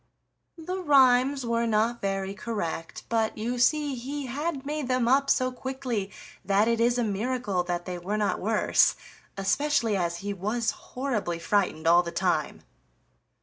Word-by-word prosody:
The 365 +3 -4
rhymes 270 -3 +4
were 235 0 0
not 225 +2 +1
very 195 0 -2
correct, 190 -6 -5
but 225 -1 0
you 240 +3 -2
see 295 +2 +2
he 270 +3 -5
had 280 +2 -3
made 295 -2 -3
them 255 -2 +1
up 275 +2 +3
so 255 -2 +2
quickly 250 -6 -4 0.3
that 200 +3 +2
it 230 -1 +1
is 240 +1 +3
a 240 - +1
miracle 215 -2 -1
that 175 -1 -3
they 180 -1 -5
were 200 +5 -2
not 210 -1 0
worse; 215 +2 +3 0.4
especially 230 +2 +1
as 170 -2 -1
he 205 - -1
was 215 +4 -1
horribly 240 -10 -3
frightened 180 -3 0
all 170 +1 +6
the 170 -1 -6
time. 170 -3 -1
230 Hz, 155 wpm, -27 LUFS, 195-260 Hz, 0.4 s, all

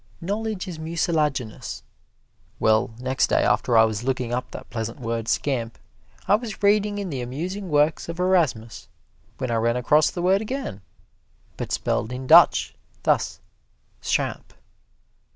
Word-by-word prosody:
Knowledge 205 +2 -3
is 170 -3 -6
mucilaginous. 155 -7 -2 0.8
Well, 110 0 +3
next 130 +2 0
day - - +2
after 110 +3 +2
I 110 - +8
was 110 0 -1
looking 125 -2 -1
up 125 +1 -2
that - - -9
pleasant 115 +2 -4
word 115 -2 -3
"scamp," 120 -5 -1 0.5
I - - +4
was 215 -1 -1
reading 205 0 +3
in 200 -4 -4
the 130 -3 -3
Amusing 175 +10 -5
Works 150 +2 +2
of 170 +1 -6
Erasmus, 150 - 0 0.5
when 130 -2 -3
I 115 - +1
ran 115 +2 +1
across 150 +5 +3
the 175 - -5
word 190 +2 +3
again, 220 - -5 0.7
but - - -5
spelled 110 - -1
in 130 +1 -5
Dutch, - - +6 0.3
thus, - - +1 0.6
"schamp." - - -2
140 Hz, 145 wpm, -24 LUFS, 115-185 Hz, 0.8 s, I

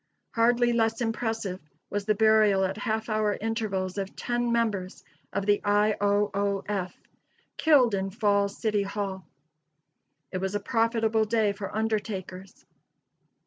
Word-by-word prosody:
Hardly 240 +1 +3
less 225 -1 +1
impressive 225 -5 -2 0.3
was 205 0 -2
the 215 0 +2
burial 215 -2 +4
at 190 +1 -2
half 220 +1 -2
hour 215 -2 0
intervals 205 -4 -2
of 195 0 -5
ten 240 0 -1
members 210 -6 -1 0.3
of 200 - -2
the 205 0 +2
I. 210 +1 +3
O. 205 0 +2
O. 200 0 -1
F., 190 -3 -3 0.6
killed 275 -8 +4
in 195 0 -1
Falls 200 -1 +1
City 215 -3 0
Hall. 195 -3 -4 1.0
It 185 - -3
was 190 +2 -2
a - - +1
profitable 225 0 +1
day 215 -2 +1
for 200 0 -7
undertakers. 200 -4 -4
210 Hz, 140 wpm, -27 LUFS, 195-225 Hz, 1.0 s, burial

